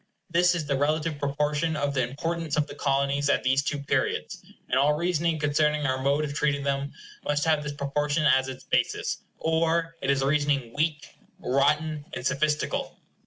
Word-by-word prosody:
This 175 +1 +4
is 165 -3 -2
the 140 -1 0
relative 155 +1 0
proportion 150 +3 0
of 145 -1 -1
the 135 - +1
importance 155 +5 -2
of 150 - +2
the - - -10
Colonies 140 0 0
at - - +2
these 135 +2 +3
two 145 +1 -2
periods, 140 0 -2 0.2
and 130 - +2
all 145 +2 +4
reasoning 170 0 0
concerning 150 0 +1
our 130 -1 0
mode 140 +3 +2
of 145 - -5
treating 145 -1 0
them 140 0 -1 0.3
must 145 +1 0
have 155 -2 +3
this 150 0 -4
proportion 145 +2 -1
as 130 -1 +4
its 130 -1 -7
basis, - - 0 0.2
or 165 +1 0
it - - -2
is 135 -1 +2
a - - +1
reasoning 140 -4 +1
weak, 155 0 -1 0.3
rotten, 150 +2 +1
and 125 - -5
sophistical. 150 +3 0
145 Hz, 180 wpm, -26 LUFS, 140-155 Hz, 0.3 s, This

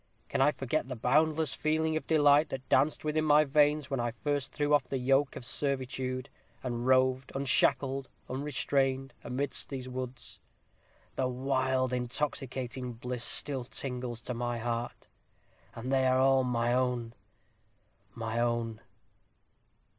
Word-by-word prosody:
Can - - 0
I 135 - +6
forget 135 0 -2
the 130 - -5
boundless 155 +4 +2
feeling 155 +1 0
of 155 - -3
delight 150 -1 +5
that 130 -1 -6
danced 145 +3 +3
within 155 +1 +1
my 150 0 +5
veins 150 0 +2
when 135 - 0
I 120 0 0
first 145 +3 -2
threw 145 0 0
off 145 - +4
the 135 - -3
yoke 135 +2 +2
of 120 - -6
servitude, 130 -1 -2 0.4
and 120 -1 -3
roved 130 0 +3
unshackled, 135 0 +2 0.2
unrestrained, 135 0 -1
amidst 140 +2 -2
these 130 -2 -5
woods? 130 -1 -5 0.8
The 130 - +1
wild 130 0 0
intoxicating 125 0 -2
bliss 125 +1 -4
still 135 -1 +3
tingles 125 -2 -3
to 125 - -4
my 120 0 -2
heart. 120 +1 -4 0.7
And 120 +3 -5
they 130 -1 +3
are 130 0 +3
all 135 0 +4
my 120 -1 0
own 125 -2 0 1.0
my 115 0 -3
own! 120 -2 -1
130 Hz, 140 wpm, -30 LUFS, 125-140 Hz, 1.0 s, I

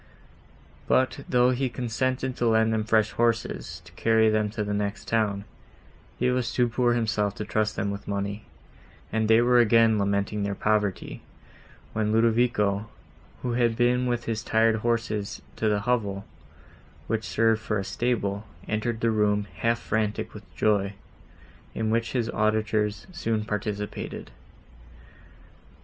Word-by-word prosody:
But, 130 0 +2
though 125 0 +4
he 130 +1 0
consented 130 +2 -2
to 120 - +1
lend 110 0 +3
them 110 -1 0
fresh 110 0 +2
horses 115 -8 -1
to 85 - -14
carry 110 +4 +3
them 110 -1 +1
to 105 0 -3
the 105 0 -2
next 100 +1 -3
town, 105 -3 0 0.7
he 125 - +2
was 125 -2 0
too 125 -1 +2
poor 120 +1 +2
himself 110 -3 0
to 105 - -5
trust 110 0 0
them 100 0 -1
with 100 0 -7
money, 100 +1 -3 0.7
and 110 -1 +1
they 110 +1 +6
were 120 0 +4
again 115 -1 +5
lamenting 100 +1 0
their 100 0 -1
poverty, 105 -3 -1 0.7
when 105 -1 0
Ludovico, 110 -2 +2 0.5
who 125 - -1
had 120 -1 +2
been 125 +1 +2
with 120 -1 -1
his 110 -2 -2
tired 110 0 +2
horses 110 -3 -2
to 110 - +1
the 105 -1 +1
hovel, 100 -4 -1 0.8
which 110 0 -1
served 115 0 +2
for 110 -1 -1
a 100 - -2
stable, 105 -2 -1 0.2
entered 110 +1 -2
the 115 - +2
room, 105 -1 +2
half 115 +5 +1
frantic 110 -2 -2
with 100 -4 -12
joy, 100 -2 +1 0.8
in 110 -1 -1
which 115 +1 0
his 120 -3 0
auditors 110 -1 0
soon 115 -11 -2
participated. 105 0 -4
110 Hz, 145 wpm, -26 LUFS, 105-115 Hz, 0.8 s, they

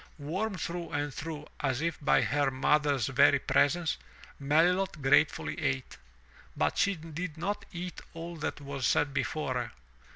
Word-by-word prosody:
Warmed 185 +7 -3
through 170 +1 -4
and 145 -1 -2
through 150 0 -6
as 130 -3 0
if 165 +1 -1
by 145 - +4
her 145 -1 +2
mother's 140 -1 +2
very 135 +3 +5
presence, 160 +4 +2 0.4
Melilot 165 +5 +2
gratefully 145 +5 +2
ate. 135 -3 -2 0.6
But - - +1
she 200 -1 +3
did 165 0 -6
not 200 +5 -2
eat 180 0 -6
all 170 +1 -6
that 155 - -3
was 140 -2 -2
set 145 -2 +2
before 150 -2 -1
her. 120 -2 -2
150 Hz, 150 wpm, -30 LUFS, 140-170 Hz, 0.6 s, very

